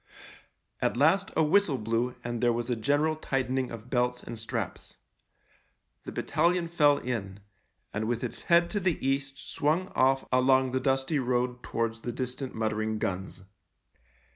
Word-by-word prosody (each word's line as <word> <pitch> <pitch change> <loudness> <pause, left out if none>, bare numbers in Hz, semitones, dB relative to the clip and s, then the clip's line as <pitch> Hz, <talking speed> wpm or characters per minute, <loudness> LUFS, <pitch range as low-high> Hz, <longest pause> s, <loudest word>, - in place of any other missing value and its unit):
At - - +1
last 165 +8 +3
a 160 - +4
whistle 170 -2 +3
blew 115 +3 -1
and 120 -1 -3
there 120 -1 +4
was 120 +1 -2
a - - +2
general 145 +7 +1
tightening 130 -3 -1
of 115 +1 -9
belts 125 -1 0
and 115 -1 -7
straps. 115 -3 -5 1.1
The - - -5
battalion 170 0 +1
fell 150 -4 +4
in, 100 -6 -4 0.5
and 110 +1 -2
with 120 0 -1
its 125 - -4
head 170 0 +5
to 205 - 0
the 180 -4 +1
east 135 0 -1
swung 165 +6 -1
off 135 +1 +2
along 130 0 +4
the 130 - 0
dusty 135 +3 +1
road 125 -1 0
towards 115 -1 -2
the 120 - -3
distant 130 +1 -4
muttering 110 0 -1
guns. 95 -1 -4
125 Hz, 155 wpm, -28 LUFS, 115-145 Hz, 1.1 s, head